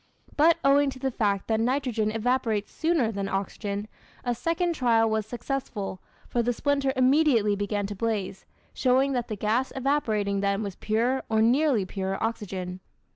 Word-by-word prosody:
But 320 +3 +5
owing 280 +1 +5
to 270 - -7
the 265 0 -2
fact 205 -4 0
that 220 -1 +1
nitrogen 245 -3 0
evaporates 225 -1 0
sooner 320 -9 +1
than 200 -2 -3
oxygen, 200 +1 -3 0.4
a 245 - 0
second 335 +8 0
trial 230 -6 +3
was 220 -1 -1
successful, 235 -6 -4 0.3
for 240 - 0
the 240 +1 +1
splinter 280 +1 +1
immediately 255 -5 +3
began 205 0 -2
to 205 +1 -5
blaze, 200 -3 -3 0.3
showing 265 +2 +2
that 245 -2 -1
the 215 - -4
gas 220 +6 0
evaporating 220 -8 0
then 200 +1 0
was 200 -3 -5
pure, 235 +5 0
or 220 -1 +2
nearly 250 -3 +3
pure, 190 0 -3
oxygen. 185 -5 -4
225 Hz, 160 wpm, -26 LUFS, 205-265 Hz, 0.4 s, But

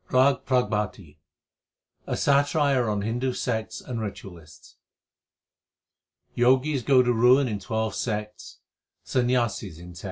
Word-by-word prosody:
RAG 130 +1 +3
PRABHATI 105 - -1 0.9
A - - -2
satire 140 -3 +2
on 105 -1 -1
Hindu 120 +4 -1
sects 110 -2 -3
and 120 -3 -5
ritualists: 95 -6 -10 1.6
Jogis 130 +3 +2
go 130 0 +4
to 125 0 +1
ruin 125 +4 +4
in 105 -4 -3
twelve 110 +3 -2
sects, 105 -2 -5 0.4
Sanyasis 120 -8 -1
in 90 +1 -11
tm. 85 - -11
115 Hz, 115 wpm, -25 LUFS, 105-130 Hz, 1.6 s, go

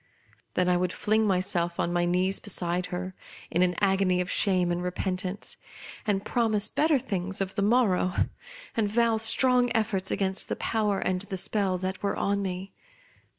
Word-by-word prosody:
Then 180 - +2
I 180 0 +3
would 180 0 0
fling 215 +2 +1
myself 180 -3 0
on 175 - 0
my 175 0 +1
knees 185 +2 +1
beside 180 -2 +1
her, 185 +1 -5 0.4
in 175 - +1
an 180 -1 +2
agony 190 -2 +2
of 180 0 -2
shame 185 -3 +3
and 175 0 -1
repentance, 185 +1 -4 0.5
and 200 -2 0
promise 215 -3 +2
better 305 +5 +2
things 195 -5 -3
of 190 -1 -2
the 200 - -2
morrow, 200 -4 +2 0.6
and 225 -3 +1
vow 230 +1 +2
strong 245 +3 +4
efforts 205 -4 0
against 190 -1 -2
the - - -1
power 210 -3 0
and 185 -1 -1
the 200 -1 -4
spell 195 -1 0
that 185 +1 -4
was 200 - -1
on 200 0 0
me. 190 0 -5
190 Hz, 170 wpm, -27 LUFS, 180-210 Hz, 0.6 s, strong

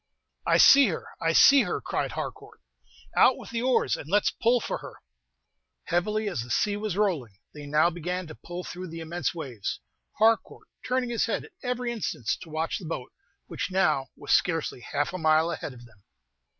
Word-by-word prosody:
"I - - +5
see 275 -2 +8
her! 175 - -3 0.2
I 165 - +2
see 275 +11 +7
her!" - - -1
cried - - -3
Harcourt; - - -7 0.6
"out - - +5
with - - -10
the 230 0 -2
oars, 255 0 +2
and 145 - -9
let's 205 +2 +3
pull 240 +2 +2
for - - -4
her." - - -10 0.9
Heavily 210 +5 0
as 180 - -2
the 120 - -9
sea 205 - +1
was 205 -3 -3
rolling, 155 - 0 0.2
they 145 -1 -9
now 155 +4 +3
began 180 +2 -4
to 155 - -9
pull 175 +3 -8
through 180 +1 -7
the 165 0 -8
immense 165 -2 -3
waves, 130 - -5 0.4
Harcourt 225 +1 +2 0.2
turning 250 -1 -1
his 235 - 0
head 225 - -2
at - - -16
every 250 -1 -2
instant 215 - -4 0.2
to 175 - -10
watch 160 +1 -2
the 185 - -9
boat, 140 -6 -5 0.3
which - - -4
now 185 -8 +1
was - - -6
scarcely 165 -7 +1
half 145 +7 -2
a 185 - -4
mile 160 +1 +3
ahead 160 - -5
of 120 -1 -13
them. 105 -4 -21
175 Hz, 190 wpm, -27 LUFS, 155-215 Hz, 0.9 s, see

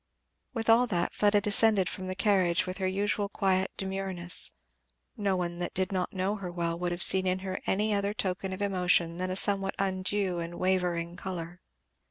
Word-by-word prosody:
With 225 -1 -3
all 235 +2 +5
that, 175 -6 -1
Fleda 205 0 +3
descended 205 -2 +3
from 185 +1 -5
the 185 - -4
carriage 190 -4 +2
with 185 +1 -6
her 190 - 0
usual 200 +1 -1
quiet 190 -2 0
demureness; 190 -2 0 0.7
no 200 -2 0
one 175 -1 -3
that 175 - -4
did 185 +1 -1
not 185 -2 -2
know 195 +2 -2
her 185 -3 -6
well 170 -1 -3
would 175 0 -2
have 175 0 0
seen 190 -1 +7
in 185 0 +1
her 185 0 -4
any 210 +2 +1
other 200 +1 -1
token 190 -1 -3
of 190 +2 -4
emotion 180 -3 +1
than 185 +1 -2
a 185 - -2
somewhat 195 0 +1
undue 190 -1 -1
and 170 0 -5
wavering 175 -2 -1
colour. 180 -1 -7
185 Hz, 190 wpm, -28 LUFS, 180-200 Hz, 0.7 s, seen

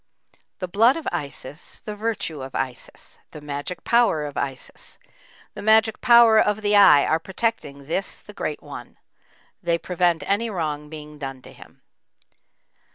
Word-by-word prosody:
The 185 - -4
blood 225 - +4
of 325 - -6
Isis, 145 +1 -6
the 210 - -6
virtue 210 -9 -3
of 130 0 -8
Isis; 130 -2 -5
the - - -10
magic 145 +4 -6
power 235 -11 +3
of 145 - -7
Isis, 135 -2 -5 0.6
the - - -8
magic 220 +1 +3
power 235 -3 +7
of 210 0 +1
the 205 0 +3
Eye 195 -8 +7
are 160 - +2
protecting 175 -7 -3
this 175 +6 -3
the - - -14
Great - - -4
one; - - -10 0.6
they 170 -2 +1
prevent 175 -2 0
any 215 +4 +1
wrong 150 -6 -3
being 150 -1 -10
done 135 -2 -6
to - - -13
him. - - -17
175 Hz, 155 wpm, -23 LUFS, 150-215 Hz, 0.6 s, power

